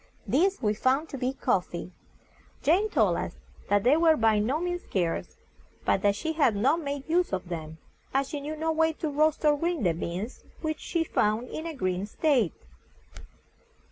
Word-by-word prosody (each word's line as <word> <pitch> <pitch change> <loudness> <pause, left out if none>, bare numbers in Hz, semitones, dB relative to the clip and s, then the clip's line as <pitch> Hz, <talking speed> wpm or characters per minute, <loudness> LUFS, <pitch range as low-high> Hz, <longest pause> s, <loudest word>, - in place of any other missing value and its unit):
These 325 - +1
we 210 -1 +3
found 265 +8 +1
to 275 - -5
be 255 +1 0
COF - - +1
FEE. - - -7 0.7
Jane 380 +8 +3
told - - +2
us - - -4 0.3
that 205 -1 +3
they 255 +5 +5
were 325 -1 +4
by 220 -2 +3
no 255 +9 0
means 355 0 -2
scarce, 175 -4 -2 0.5
but - - +2
that 205 -1 +3
she 320 +9 -2
had 275 -9 +3
not 260 +11 +2
made 280 -2 -4
use 350 +2 +2
of 185 -2 -3
them, 160 -2 -5 0.3
as 270 0 +1
she 295 -3 -4
knew 300 +2 -4
no 320 +1 -1
way 320 0 +2
to 310 0 -3
roast 310 +2 +2
or 295 -1 +5
grind 335 - 0
the 170 - +3
beans, 180 +8 -5 0.2
which 315 -1 -2
she 335 -2 -1
found 220 -4 0
in 315 - -5
a 325 - -5
green 185 -4 -1
state. 245 - +1
280 Hz, 190 wpm, -28 LUFS, 210-320 Hz, 0.7 s, they